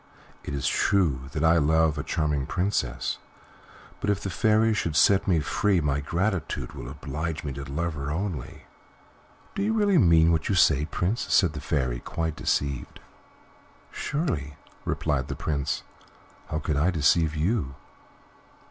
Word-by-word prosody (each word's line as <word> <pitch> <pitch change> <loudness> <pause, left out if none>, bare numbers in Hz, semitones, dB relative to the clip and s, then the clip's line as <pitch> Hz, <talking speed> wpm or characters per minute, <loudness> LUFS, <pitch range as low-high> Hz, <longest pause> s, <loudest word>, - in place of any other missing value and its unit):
It 70 - -4
is 70 - -3
true 75 -10 +1
that 75 - -2
I 80 +1 +5
love 80 +1 +3
a 70 - -2
charming 75 -4 -1
princess, 90 -10 -1 0.8
but - - -2
if 100 -1 +1
the 100 - -4
Fairy 110 +4 +3
should 85 -7 -1
set 95 +5 +4
me 85 -5 +3
free 100 +5 +1
my 75 -3 0
gratitude 90 +5 -2
would - - -8
oblige 75 +4 -4
me 70 -3 -4
to 70 +1 -6
love 85 +3 -2
her 70 -1 -5
only." 80 -4 -4 0.9
"Do - - -3
you 215 +2 +1
really 205 -5 +3
mean 85 - +5
what 80 -1 0
you 100 - +2
say, 75 -4 +4
Prince?" 90 +8 -2
said 90 -5 +4
the 75 - -6
Fairy, 65 -6 -1
quite 80 +2 -3
deceived. 70 -4 -2 0.9
"Surely," 85 - -2 0.3
replied 70 -4 -1
the - - -4
Prince; 70 -3 -2 0.6
"how 75 - -3
could 75 -2 -1
I 80 +5 +3
deceive 80 -1 +2
you? 80 - -1
80 Hz, 155 wpm, -26 LUFS, 70-95 Hz, 0.9 s, I